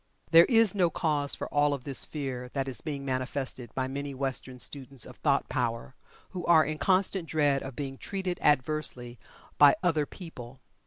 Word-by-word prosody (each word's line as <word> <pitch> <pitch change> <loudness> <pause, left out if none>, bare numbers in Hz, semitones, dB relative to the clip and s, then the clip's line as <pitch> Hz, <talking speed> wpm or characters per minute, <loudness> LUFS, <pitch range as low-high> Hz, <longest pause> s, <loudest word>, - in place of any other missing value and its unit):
There 165 +1 +9
is 225 -5 +4
no 180 -4 +2
cause 150 -4 0
for - - -5
all 145 0 +3
of 130 - -10
this 135 -2 +3
fear 130 -4 -5
that 135 -1 -2
is 130 - -6
being 140 -3 -5
manifested 130 -1 -3
by 130 -1 -1
many 140 +1 -5
Western 130 -1 -3
students 135 0 -3
of - - -12
thought 140 -2 +1
power, 115 - -2 0.4
who 180 -2 -5
are 160 -3 +6
in 155 +1 -4
constant 190 -2 +1
dread 145 -3 +2
of 135 -2 -7
being 135 -1 -5
"treated" 190 -2 -4
adversely 130 -4 0 0.4
by 145 -1 +8
other 155 -5 +1
people. 130 -8 -10
140 Hz, 175 wpm, -28 LUFS, 130-160 Hz, 0.4 s, There